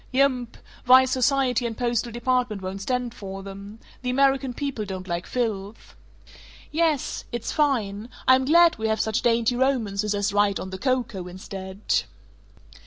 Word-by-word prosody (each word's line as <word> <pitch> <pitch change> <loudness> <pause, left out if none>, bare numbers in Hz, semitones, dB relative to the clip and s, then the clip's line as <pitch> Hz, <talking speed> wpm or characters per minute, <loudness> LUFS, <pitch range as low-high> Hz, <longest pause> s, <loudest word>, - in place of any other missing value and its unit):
"Yump. 255 -3 +1 0.3
Vice 260 +1 +6
Society 260 -1 +2
and 225 - -6
Postal 240 -1 -1
Department 240 -2 0
won't 190 +1 -5
stand 250 +2 -2
for 195 -2 -8
them. 200 +2 -9 0.2
The 250 - -3
American 270 0 +2
people 260 -3 -3
don't 190 -2 -6
like 175 0 -3
filth." 220 -4 -4 0.8
"Yes. 310 -3 0
It's 240 -2 -3
fine. 235 -8 0 0.2
I'm 260 0 +5
glad 335 0 +5
we 220 - 0
have 220 0 0
such 220 +2 0
dainty 235 0 +2
romances 215 -6 0
as 205 0 -1
'Right 205 -1 +2
on 190 - -6
the 190 - -6
Coco' 240 -8 -1
instead." 190 +2 -3
235 Hz, 150 wpm, -25 LUFS, 200-260 Hz, 0.8 s, Vice